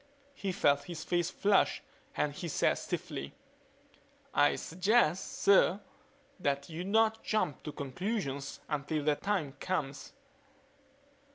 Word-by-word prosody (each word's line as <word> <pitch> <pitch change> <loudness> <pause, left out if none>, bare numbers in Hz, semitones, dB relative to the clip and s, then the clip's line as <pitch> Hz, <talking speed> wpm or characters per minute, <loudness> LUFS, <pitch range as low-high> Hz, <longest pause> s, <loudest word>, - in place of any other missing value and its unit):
He 200 -8 -3
felt 145 -5 +2
his 170 -3 -6
face 175 -1 0
flush 200 +1 +2 0.3
and 150 -1 +1
he 170 - -5
said 160 - +1
stiffly, 70 +1 -5 1.0
"I - - +4
suggest, 185 0 +1
sir, 200 -1 +5 0.6
that 140 -3 -1
you 165 +3 -4
not 220 +3 +2
jump 215 -10 0
to 150 - -6
conclusions 140 - -3
until 150 0 -2
that 150 0 +1
time 185 -9 -1
comes." 145 -7 -3
165 Hz, 115 wpm, -32 LUFS, 145-195 Hz, 1.0 s, sir